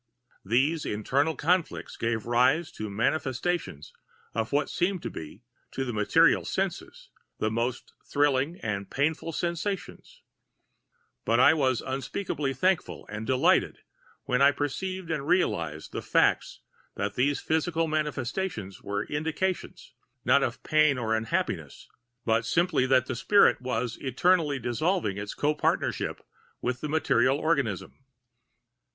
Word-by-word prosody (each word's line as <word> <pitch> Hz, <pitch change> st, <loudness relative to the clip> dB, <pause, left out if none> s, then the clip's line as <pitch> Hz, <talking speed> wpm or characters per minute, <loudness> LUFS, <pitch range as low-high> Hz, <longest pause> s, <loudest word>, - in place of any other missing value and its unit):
These 135 Hz, +10 st, +1 dB
internal 140 Hz, +9 st, 0 dB
conflicts 175 Hz, +2 st, 0 dB
gave 115 Hz, -2 st, -2 dB
rise 125 Hz, +8 st, +2 dB
to 110 Hz, -1 st, -6 dB
manifestations 130 Hz, -, -2 dB, 0.4 s
of 110 Hz, 0 st, -2 dB
what 145 Hz, +1 st, +1 dB
seemed 180 Hz, 0 st, -1 dB
to -, -, -4 dB
be, 80 Hz, -, -9 dB, 0.3 s
to 135 Hz, -, -2 dB
the 120 Hz, -, -3 dB
material 105 Hz, -1 st, +4 dB
senses, -, -, -4 dB, 0.3 s
the 110 Hz, -, -1 dB
most 120 Hz, +3 st, -2 dB
thrilling 145 Hz, +3 st, +1 dB
and 100 Hz, -2 st, -3 dB
painful 155 Hz, +4 st, -1 dB
sensations; 195 Hz, -, -4 dB, 1.0 s
but -, -, +2 dB
I -, -, +7 dB
was 130 Hz, -6 st, +1 dB
unspeakably 135 Hz, +2 st, -3 dB
thankful 185 Hz, +7 st, 0 dB
and 110 Hz, +1 st, -5 dB
delighted 130 Hz, -1 st, +2 dB, 0.4 s
when 125 Hz, +1 st, 0 dB
I 140 Hz, -, +8 dB
perceived 170 Hz, +5 st, -3 dB
and 145 Hz, -3 st, -2 dB
realized 85 Hz, -, 0 dB
the -, -, -4 dB
fact -, -, +2 dB, 0.5 s
that -, -, -2 dB
those 140 Hz, +3 st, +1 dB
physical 160 Hz, +1 st, 0 dB
manifestations 150 Hz, -, -3 dB
were[Pg 100 Hz, +1 st, -3 dB
196] -, -, -2 dB
indications, 165 Hz, +1 st, -3 dB, 0.3 s
not 130 Hz, +3 st, +5 dB
of 125 Hz, 0 st, -2 dB
pain 155 Hz, -3 st, +3 dB
or 110 Hz, -3 st, -1 dB
unhappiness, 110 Hz, 0 st, -3 dB, 0.4 s
but 115 Hz, 0 st, +2 dB
simply 165 Hz, +1 st, +2 dB
that 130 Hz, -1 st, +4 dB
the 130 Hz, -, -4 dB
spirit 200 Hz, -, +4 dB
was 125 Hz, -2 st, -2 dB
eternally 150 Hz, +2 st, +2 dB
dissolving 125 Hz, -, -1 dB
its 100 Hz, 0 st, -5 dB
co 150 Hz, +1 st, +1 dB
partnership 150 Hz, -, -1 dB, 0.3 s
with 125 Hz, 0 st, -2 dB
the 150 Hz, -, -3 dB
material 135 Hz, -4 st, +2 dB
organism. 140 Hz, -, -1 dB
135 Hz, 130 wpm, -27 LUFS, 115-160 Hz, 1.0 s, I